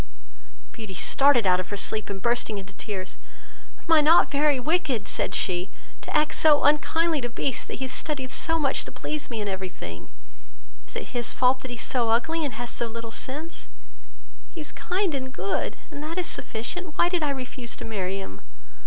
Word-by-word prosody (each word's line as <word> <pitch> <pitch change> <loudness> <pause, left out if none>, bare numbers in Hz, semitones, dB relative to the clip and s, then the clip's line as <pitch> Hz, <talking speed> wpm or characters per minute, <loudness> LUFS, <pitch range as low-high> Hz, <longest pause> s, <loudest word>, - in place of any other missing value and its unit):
Beauty 215 -4 -8
started 275 -1 +4
out 180 -1 +5
of 185 - -4
her 205 - -3
sleep 215 +2 0
and 200 -1 -4
bursting 235 -1 +1
into 195 0 -8
tears, 190 -1 -6 0.7
"Am 320 -2 +6
not 325 +3 +7
I - - -20
very 290 -1 +3
wicked, 290 - 0
(said - - 0
she) 180 +1 0 0.3
to - - 0
act 300 0 +2
so 300 -2 +5
unkindly 310 +1 +3
to 240 - -2
Beast, 245 +2 -2
that - - -5
has 260 -1 -1
studied 270 -4 -2
so 325 0 +2
much 280 -4 +1
to - - -9
please 305 -1 -4
me 230 -3 -3
in 205 - -2
every 190 -1 -3
thing? 85 - -9 0.8
Is - - -6
it - - -4
his 240 -2 -1
fault 255 +1 +3
that 260 - -7
he 245 - -5
is - - -3
so 240 -3 +1
ugly, 320 +9 +2
and 275 -7 -2
has 240 +1 -3
so 235 - +1
little 230 0 -6
sense? 285 - -5 0.9
He - - -6
is 300 - -3
kind 365 -1 -1
and 260 -1 -3
good, 395 - -2
and 285 - -6
that 320 +3 -5
is 365 - 0
sufficient. 305 +10 -3
Why - - +5
did 355 -1 0
I 300 - +1
refuse 255 -3 -4
to - - -7
marry 195 -3 -2
him? 100 - -8
255 Hz, 205 wpm, -26 LUFS, 215-300 Hz, 0.9 s, not